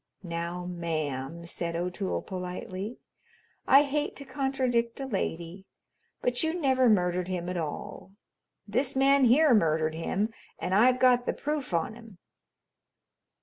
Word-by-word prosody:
"Now, 170 +1 -4
ma'am," 165 -3 -3
said 170 0 -4
O'Toole 180 +3 -2
politely, 185 +3 -5 0.7
"I 275 +2 +8
hate 295 +1 -2
to 280 - -9
contradict 260 -4 -1
a 270 - -3
lady, 190 -5 -4 0.6
but 245 0 0
you 320 +2 0
never 260 -4 +3
murdered 180 -3 +2
him 180 -2 -3
at 180 - -3
all. 165 +3 -5 0.6
This 255 +6 0
man 275 0 +5
here 275 +4 +5
murdered 160 -5 +2
him, 195 +7 -1 0.2
and 185 - -3
I've 250 +5 +5
got 250 -1 +4
the - - +1
proof 295 -4 -3
on 170 +4 0
him." 225 -4 -14
200 Hz, 135 wpm, -28 LUFS, 170-255 Hz, 0.7 s, I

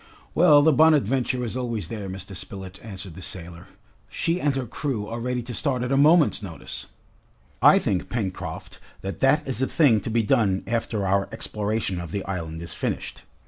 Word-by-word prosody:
"Well, 150 -4 +6
the 160 0 +5
'Bonadventure' 135 -4 +3
is 115 - -4
always 115 -8 -3
there, 100 -1 -5
Mr. 95 +1 -7
Spilett," 95 0 -8
answered 95 -5 -8
the 95 - -10
sailor. 85 -3 -6 0.4
"She 170 +2 -1
and 145 -2 +1
her 135 -2 -2
crew 120 -3 -3
are 115 +2 -4
ready 125 0 -2
to 120 +1 -6
start 130 -2 0
at 125 - -2
a - - +3
moment's 150 +1 +5
notice!" 80 -8 -7 0.7
"I - - +8
think, 90 -1 -1
Pencroft, 95 -4 -4 0.2
that 95 0 -5
that 135 +3 +3
is 130 -2 -2
a 130 - +2
thing 125 -10 +4
to - - -4
be 115 0 +2
done 105 -5 +2
after 110 -3 -1
our 95 +1 +1
exploration 105 -3 -2
of 85 -1 -6
the 100 +3 -4
island 85 -4 -4
is 80 -2 -7
finished. - - -4
110 Hz, 185 wpm, -25 LUFS, 95-130 Hz, 0.7 s, I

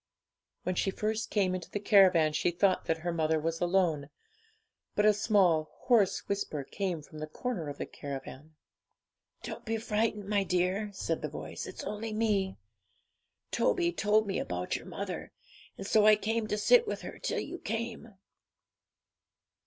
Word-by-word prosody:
When 185 - 0
she 190 - 0
first 215 +3 -2
came 190 -3 +1
into 185 -1 -5
the 205 - -3
caravan, 185 -7 +5
she 150 - +2
thought 185 +2 +2
that 165 - +1
her 175 - 0
mother 160 -1 +1
was 165 +1 -2
alone, 175 -5 +1 0.9
but 210 - +3
a 215 - +7
small 190 -7 +3
hoarse 225 -7 +3
whisper 195 -8 -2
came 175 0 -3
from 155 +1 -11
the 155 - -4
corner 175 - -4
of 145 - -7
the - - -3
caravan 140 +2 -8 0.9
'Don't - - -6
be 225 0 -1
frightened, 215 -2 -1
my 205 -1 +2
dear,' 185 +3 0
said 165 -4 -2
the 150 - -3
voice; 150 - -6
'it's - - -7
only 215 +1 -4
me. 205 -3 0 0.9
Toby 345 -1 +2
told 215 -5 +2
me 195 - -1
about 90 0 -2
your - - -6
mother, - - -5 0.5
and 195 - -6
so 210 +1 +4
I 215 - +8
came 220 +1 -1
to 210 - -1
sit 475 - +5
with - - -3
her - - -8
till - - -1
you 355 - -6
came.' 225 0 -4
195 Hz, 165 wpm, -30 LUFS, 165-215 Hz, 0.9 s, I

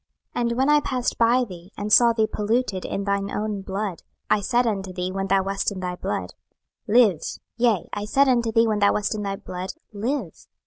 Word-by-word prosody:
26:016:006 245 - 0
And 235 - -2
when 265 +1 +2
I 300 - +6
passed 255 -4 -2
by 240 +2 +4
thee, 180 -4 -10
and 210 +1 -1
saw 235 +1 +7
thee 225 -1 +2
polluted 215 -2 -1
in 200 - -3
thine 200 0 -1
own 210 -1 -3
blood, 195 -2 -4 0.3
I 205 - +4
said 240 +5 +2
unto 195 -4 -2
thee 180 0 -3
when 195 0 -2
thou 195 0 +3
wast 195 +2 -1
in 195 - -6
thy 180 -1 -3
blood, - - -4 0.5
Live; 210 -7 +4 0.3
yea, 230 -6 +2
I 205 - -3
said 275 +6 +3
unto 235 -3 +2
thee 230 +1 +4
when 215 -2 0
thou 200 0 +4
wast 210 +1 0
in 215 - -4
thy 200 -1 -2
blood, 185 0 -6 0.2
Live. 220 - -4
210 Hz, 215 wpm, -24 LUFS, 195-235 Hz, 0.5 s, saw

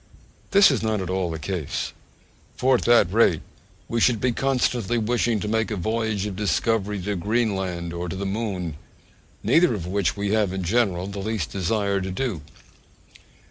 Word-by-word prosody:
This 200 -4 +6
is 130 - 0
not 110 -1 0
at 95 -1 -3
all 95 -2 0
the 80 - -4
case; 80 -1 -3 0.6
for 130 +1 +3
at 125 - +1
that 120 -6 +4
rate 105 -8 +3 0.4
we 115 0 -1
should 120 -2 +4
be 125 +2 +1
constantly 120 -3 0
wishing 115 0 +1
to - - -3
make 110 +1 0
a 110 - -2
voyage 110 +1 -1
of 105 -3 -4
discovery 105 +2 0
to 105 +1 -2
Greenland 95 -4 -1
or 85 +1 -4
to 95 - -4
the 100 +1 -4
Moon, 95 -6 -3 0.7
neither 165 -7 +4
of 90 -5 -5
which 95 +1 0
we 100 0 -1
have, 105 -4 +1
in 95 -1 -3
general, 95 -2 +1
the 100 +1 -6
least 105 -4 -2
desire 100 +1 0
to 95 - -3
do. 95 - -2
105 Hz, 180 wpm, -24 LUFS, 95-115 Hz, 0.7 s, This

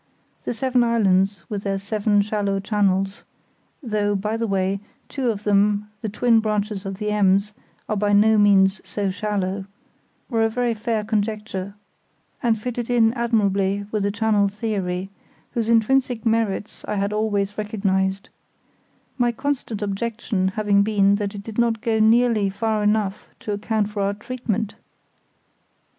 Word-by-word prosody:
The - - -1
seven 250 +1 +2
islands, 200 -5 +2
with 205 -2 -4
their 195 -1 -1
seven 205 +1 +1
shallow 200 -1 -1
channels 195 -1 0 0.6
(though, 210 -3 0
by 210 +3 -1
the 230 0 -1
way, 195 0 0 0.3
two 265 -4 -1
of 210 -2 -3
them, 205 0 +2
the 220 - -3
twin 230 +2 +3
branches 210 -2 -2
of 195 - -4
the 210 +1 -3
Ems, 200 0 +2 0.3
are 215 - -1
by 205 0 +1
no 215 +1 +5
means 195 -1 +4
so 200 -2 -2
shallow), 195 -1 -2 0.6
were 225 -3 +1
a 225 - +3
very 240 +1 0
fair 220 0 -2
conjecture, 210 -2 -3 0.7
and 230 -3 +1
fitted 240 +1 -4
in 230 -2 +4
admirably 200 -4 +1
with 215 - 0
the 200 - +1
channel 210 -1 +2
theory, 195 -3 -3 0.4
whose 230 -1 -1
intrinsic 245 +1 +2
merits 220 -2 -1
I - - -2
had 200 +1 -1
always 205 -2 0
recognised; 195 -2 -1 0.9
my 240 -1 +3
constant 245 -4 -3
objection 205 -1 -1
having 200 +1 +2
been 200 -1 +3
that 205 0 -3
it 200 - -7
did 220 +1 -5
not 230 -1 +2
go 225 -1 0
nearly 220 -2 +4
far 215 +2 -1
enough 210 -1 0
to 210 - -4
account 210 0 -1
for 210 -1 -3
our 200 +1 0
treatment. 220 -2 -3
210 Hz, 150 wpm, -22 LUFS, 200-225 Hz, 0.9 s, no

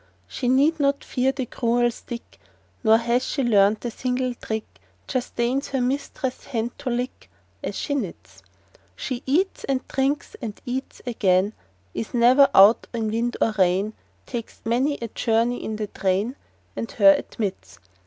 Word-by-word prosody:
She 250 - -3
need 290 +5 +3
not 280 0 +1
fear 260 +1 +1
the 270 -1 -3
cruel 240 +1 +1
stick, 235 0 -9 0.4
Nor 220 -1 +6
has 235 +2 +1
she 275 - -1
learnt 210 -1 +3
a 240 - -1
single 255 +1 -1
trick— 220 -2 -6 0.3
Just 255 -2 -3
deigns 250 +4 0
her 270 - -1
mistress' 260 0 -2
hand 235 -2 -2
to 260 - -3
lick, 245 +1 -3 0.3
As - - -4
she 285 - -2
knits. 230 -12 -5 0.5
She 255 -2 -4
eats, 360 +8 +1
and 270 -1 -1
drinks, 275 +2 -1
and 220 -4 -5
eats 260 +2 -5
again, 200 -4 +2 0.4
Is 225 - -4
never 255 +4 +6
out 200 +4 +7
in 220 -2 -1
wind 235 +2 -1
or 225 - +3
rain,— 190 +4 +2 0.3
Takes 235 -3 -6
many 255 +6 +1
a - - -2
journey 230 +3 +1
in 220 - -3
the 215 0 -2
train, 200 +5 -1 0.4
And 230 - -4
her 200 -3 +7
admits. 100 - -4
240 Hz, 160 wpm, -24 LUFS, 220-260 Hz, 0.5 s, out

